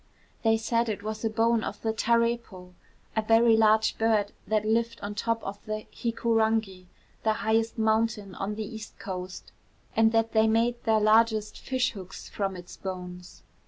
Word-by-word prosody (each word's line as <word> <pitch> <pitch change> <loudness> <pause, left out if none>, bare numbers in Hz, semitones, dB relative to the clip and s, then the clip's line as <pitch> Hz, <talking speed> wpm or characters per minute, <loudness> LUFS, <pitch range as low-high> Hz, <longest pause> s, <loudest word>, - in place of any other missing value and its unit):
They 225 -1 +3
said 230 +1 0
it 205 -1 -4
was 215 +1 -5
a 225 - +1
bone 225 +1 +2
of - - -5
the 220 -1 0
tarepo, 230 -5 0 0.4
a 220 - +2
very 225 +1 +5
large 220 0 +3
bird, 220 -2 +2 0.2
that 215 0 +1
lived 230 +1 0
on 205 - -3
the 205 - -5
top 230 0 -1
of 200 +1 -7
Hikurangi, 220 -3 -1 0.3
the 220 - +2
highest 225 +1 0
mountain 220 -2 0
on 200 +3 -4
the 215 0 -4
east 220 0 -9
coast, 185 -1 -7 0.4
and 225 0 +4
that 225 0 +1
they 220 0 +4
made 235 +2 +1
their 220 -1 +3
largest 215 0 +3
fish 255 -1 0
hooks 190 -3 -9
from 195 -2 -2
its 180 -1 -10
bones. 180 -1 -8
220 Hz, 165 wpm, -27 LUFS, 205-225 Hz, 0.4 s, very